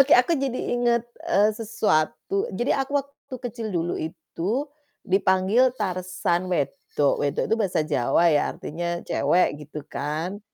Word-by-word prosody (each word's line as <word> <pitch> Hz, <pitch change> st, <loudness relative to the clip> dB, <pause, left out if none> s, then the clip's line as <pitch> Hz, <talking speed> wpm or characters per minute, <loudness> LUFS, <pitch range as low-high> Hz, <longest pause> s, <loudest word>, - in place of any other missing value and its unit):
Oke, 275 Hz, +1 st, +5 dB
aku 250 Hz, +7 st, +4 dB
jadi 270 Hz, -4 st, -1 dB, 0.2 s
inget, 240 Hz, -1 st, +2 dB, 0.2 s
eee, 210 Hz, +2 st, +4 dB
sesuatu, 225 Hz, -, 0 dB
jadi 240 Hz, -, +1 dB
aku 275 Hz, +2 st, -1 dB
waktu 280 Hz, -1 st, -13 dB
kecil 225 Hz, -1 st, -5 dB
dulu 175 Hz, -3 st, -1 dB
itu 190 Hz, -, -3 dB, 0.4 s
dipanggil 195 Hz, +7 st, +3 dB
Tarzan 185 Hz, -2 st, -1 dB
wedok. 145 Hz, -3 st, 0 dB
Wedok 145 Hz, -1 st, 0 dB
itu -, -, +7 dB
bahasa 195 Hz, -6 st, +1 dB
Jawa 150 Hz, +5 st, +3 dB
ya, 145 Hz, -, +2 dB
artinya 170 Hz, +2 st, -4 dB
cewek, 170 Hz, -4 st, +2 dB
gitu 150 Hz, 0 st, -8 dB
kan. 155 Hz, +7 st, -4 dB
185 Hz, 135 wpm, -25 LUFS, 165-240 Hz, 0.4 s, itu